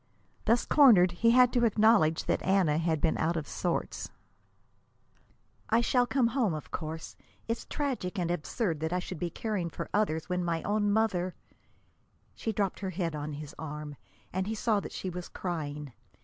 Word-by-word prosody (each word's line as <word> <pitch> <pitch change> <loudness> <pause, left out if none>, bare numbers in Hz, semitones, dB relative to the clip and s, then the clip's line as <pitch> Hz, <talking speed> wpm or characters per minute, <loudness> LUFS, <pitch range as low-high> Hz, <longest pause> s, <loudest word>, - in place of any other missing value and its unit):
Thus 235 +2 +3
cornered, 215 - +6
he 230 +7 +2
had 250 +1 +6
to 245 -2 +2
acknowledge 210 -7 +4
that - - 0
Anna 185 -6 +2
had 160 -2 0
been 160 - +1
out 165 +2 +1
of 155 - -4
sorts. 175 -2 -2 1.6
"I 225 +2 +4
shall 245 +1 +2
come 250 -3 +2
home, 235 - +1
of 155 - -8
course. 160 -1 -5 0.3
It's 230 +1 -3
tragic 255 -10 -3
and 175 -2 0
absurd 175 0 -2
that 160 +1 -2
I 180 - +1
should 180 -2 -5
be 175 - -1
caring 195 -2 -3
for - - -7
other 205 -6 +2
people, 180 - -6
when 180 - 0
my 165 -1 -1
own 205 0 +1
mother 195 -5 +1 0.5
" - - -39
She 225 - -3
dropped 200 -3 -1
her 195 - -3
head 170 -3 -2
on 150 0 -4
his 150 +1 -7
arm, 150 -1 -6 0.4
and 190 +1 -1
he 220 - -2
saw 215 -1 +1
that - - -7
she 185 - -4
was 180 0 -6
crying. 150 -6 -5
180 Hz, 185 wpm, -30 LUFS, 160-220 Hz, 1.6 s, cornered